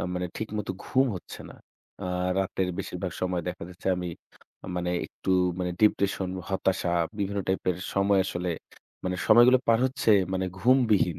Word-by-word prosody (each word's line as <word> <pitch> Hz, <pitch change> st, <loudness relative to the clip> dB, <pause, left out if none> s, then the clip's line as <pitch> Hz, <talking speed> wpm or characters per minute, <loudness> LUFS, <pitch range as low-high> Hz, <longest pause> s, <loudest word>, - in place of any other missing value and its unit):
আ -, -, -2 dB
মানে 90 Hz, 0 st, -1 dB
ঠিকমতো 105 Hz, -3 st, -3 dB
ঘুম 130 Hz, +1 st, +3 dB
হচ্ছে 85 Hz, -, -10 dB
না। -, -, -11 dB, 0.5 s
আ -, -, -3 dB, 0.3 s
রাতের 95 Hz, -1 st, 0 dB
বেশিরভাগ 90 Hz, -2 st, -4 dB
সময় 90 Hz, -2 st, -1 dB
দেখা 90 Hz, -, -5 dB
যাচ্ছে 90 Hz, +1 st, -12 dB
আমি 90 Hz, -1 st, -3 dB, 0.7 s
মানে 90 Hz, 0 st, -1 dB, 0.2 s
একটু -, -, -5 dB, 0.3 s
মানে 90 Hz, -1 st, -1 dB
depression, 100 Hz, -2 st, +2 dB, 0.2 s
হতাশা, 95 Hz, -2 st, 0 dB, 0.3 s
বিভিন্ন 100 Hz, 0 st, -1 dB
type 95 Hz, -, 0 dB
এর 85 Hz, -, -2 dB, 0.2 s
সময় 100 Hz, 0 st, +3 dB
আসলে 90 Hz, -1 st, -2 dB, 0.5 s
মানে 90 Hz, 0 st, -1 dB
সময়গুলো 120 Hz, +3 st, +7 dB
পার 115 Hz, 0 st, +5 dB
হচ্ছে 130 Hz, -3 st, 0 dB, 0.2 s
মানে 95 Hz, 0 st, 0 dB
ঘুমবিহীন। 110 Hz, -, +3 dB
95 Hz, 155 wpm, -27 LUFS, 90-105 Hz, 0.7 s, সময়গুলো